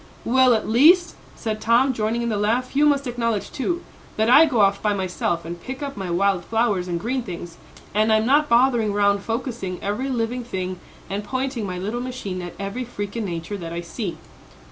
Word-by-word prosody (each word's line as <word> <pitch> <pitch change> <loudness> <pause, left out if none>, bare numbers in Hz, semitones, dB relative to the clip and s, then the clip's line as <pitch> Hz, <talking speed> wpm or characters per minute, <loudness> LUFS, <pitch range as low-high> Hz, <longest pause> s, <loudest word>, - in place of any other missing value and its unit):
"Well, 255 0 +5
at 220 - -2
least," 325 +10 +5 0.2
said 215 -2 -4
Tom, 235 +4 +3
joining 230 +1 -1
in 235 - -1
the 215 - 0
laugh, 230 +6 0
"you 295 +1 +5
must 285 -1 +2
acknowledge, 230 -4 -2
too, 345 +6 -2 0.3
that 220 +2 +3
I 300 +5 +9
go 245 -7 +2
off 200 0 +3
by 210 -1 +1
myself 180 -3 -2
and 170 +1 -7
pick 260 - -6
up 280 -1 -4
my 190 -3 -5
wild 185 +1 +1
flowers 215 -4 0
and 170 -1 -2
green 255 +7 -1
things, 175 -5 -8 0.4
and 215 +2 +3
I'm 220 0 +3
not 295 +4 +3
bothering 235 -3 +3
round 200 0 +3
focussing 225 -4 -4
every 220 +7 -2
living 245 0 -1
thing 185 -5 -4 0.3
and 200 +2 -3
pointing 260 -1 -2
my 180 -1 -4
little 210 +7 -3
machine 245 -8 -5
at 175 -1 -7
every 200 +6 -4
freak 205 -4 -6
in 230 -2 -2
nature 170 +2 -4
that 170 -3 -6
I 170 - -3
see." 175 +2 -5
220 Hz, 205 wpm, -23 LUFS, 195-250 Hz, 0.4 s, I